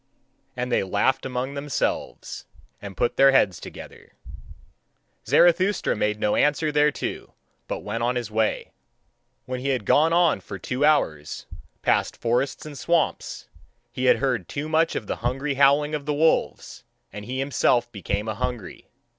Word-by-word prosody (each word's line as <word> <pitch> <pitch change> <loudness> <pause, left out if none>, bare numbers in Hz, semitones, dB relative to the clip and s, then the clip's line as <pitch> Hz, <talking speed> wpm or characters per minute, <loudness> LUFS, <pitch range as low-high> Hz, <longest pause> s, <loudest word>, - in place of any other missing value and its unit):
And 125 0 -3
they - - +3
laughed 100 +8 0
among 130 +1 -3
themselves, 140 0 -3 0.4
and 100 -2 -9
put 120 - 0
their 135 0 +7
heads 95 -9 +3
together. - - -11 1.1
Zarathustra 185 +3 +3
made 105 0 -1
no 105 - +1
answer 150 +1 +2
thereto, 150 0 -1 0.3
but - - -4
went 110 +3 -4
on 120 +1 0
his 120 -3 -3
way. 110 0 -1 0.7
When 130 0 -4
he 130 - -4
had 130 -6 -1
gone 155 +9 +4
on 170 -2 +3
for - - -8
two 130 +1 -3
hours, 80 - +1 0.4
past - - +1
forests 125 +6 -1
and 150 -1 -8
swamps, 170 +1 -1 0.4
he 130 +2 -3
had 125 - +5
heard 125 -9 -1
too 150 +2 -4
much 160 +1 +1
of 110 - -3
the - - -3
hungry 135 +4 -2
howling 140 +2 +3
of 150 -1 -4
the 150 - 0
wolves, 160 +2 0 0.3
and 105 0 -7
he 130 +3 -4
himself 130 -3 +1
became 100 0 -3
a 110 - -1
hungry. 120 -3 -5
130 Hz, 155 wpm, -24 LUFS, 115-150 Hz, 1.1 s, their